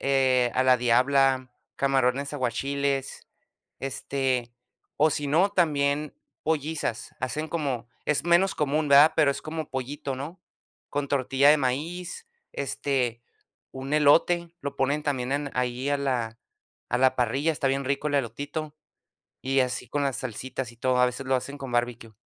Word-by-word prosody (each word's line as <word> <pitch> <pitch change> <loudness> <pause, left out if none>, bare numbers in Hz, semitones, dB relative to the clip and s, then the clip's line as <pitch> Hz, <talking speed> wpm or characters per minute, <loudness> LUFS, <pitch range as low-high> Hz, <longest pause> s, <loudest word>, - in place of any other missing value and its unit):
eh, 130 -2 +3
a 130 - +3
la 130 -1 +6
diabla, 130 +2 +3 0.3
camarones 135 +1 +1
aguachiles, 140 +1 -2 0.5
este, 130 -2 -2 0.4
o 155 +1 +4
si 145 -1 -2
no, 175 +7 +3
también 150 -5 +1 0.3
pollizas. 155 -6 -2
Hacen 150 +5 -2
como 135 -8 -2 0.2
es 150 +1 0
menos 175 +3 +4
común, 150 +1 0
¿verdad? 140 +3 +7
Pero 145 - +5
es 140 - -4
como 155 -1 -5
pollito, 135 +1 -4
¿no? 150 +8 -7 0.5
Con 145 0 -1
tortilla 135 +1 +3
de 155 - +6
maíz, 165 - -3 0.3
este, 130 -4 -2 0.5
un 135 +2 -6
elote, 165 +3 +4
lo 140 0 -4
ponen 140 +3 0
también 130 -3 -1
en 145 0 -1
ahí 125 +1 -1
a 145 - +2
la 125 -5 -1 0.5
a 125 - 0
la 130 0 +4
parrilla, 135 +6 +1
está 140 -3 -1
bien 135 +1 0
rico 140 +3 -1
el 145 - -3
elotito. 145 +5 -3 0.7
Y 135 +1 +2
así 125 -1 -2
con 145 - -1
las 135 -3 -1
salsitas 130 +1 -5
y - - -19
todo, 125 +2 +1
a 125 - +6
veces 125 +2 -4
lo 130 0 +3
hacen 140 +3 -5
con 135 -3 -7
barbecue. 120 -2 -2
140 Hz, 155 wpm, -26 LUFS, 130-145 Hz, 0.7 s, verdad